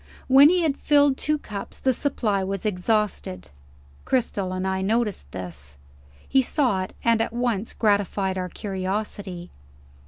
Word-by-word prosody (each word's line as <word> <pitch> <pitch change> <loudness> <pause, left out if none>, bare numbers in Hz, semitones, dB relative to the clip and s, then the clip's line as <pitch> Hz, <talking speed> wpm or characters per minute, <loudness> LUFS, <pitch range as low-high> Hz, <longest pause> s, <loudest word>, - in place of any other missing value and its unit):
When 275 +3 +8
he 360 0 +2
had 295 -4 +1
filled 285 -2 +4
two 300 +3 0
cups, 205 -8 -7
the 260 - +1
supply 225 -8 0
was 195 +1 -4
exhausted. 195 - -1 0.5
Cristel 205 -7 -1
and 185 0 -3
I 190 0 -1
noticed 210 - -1
this. 75 -6 -7 0.5
He 270 - +4
saw 250 -7 +1
it, 185 - -6
and 230 -1 +3
at 225 - -2
once 235 -3 -1
gratified 200 -2 +1
our 185 -1 -3
curiosity. 190 -1 -4
205 Hz, 145 wpm, -24 LUFS, 185-245 Hz, 0.5 s, When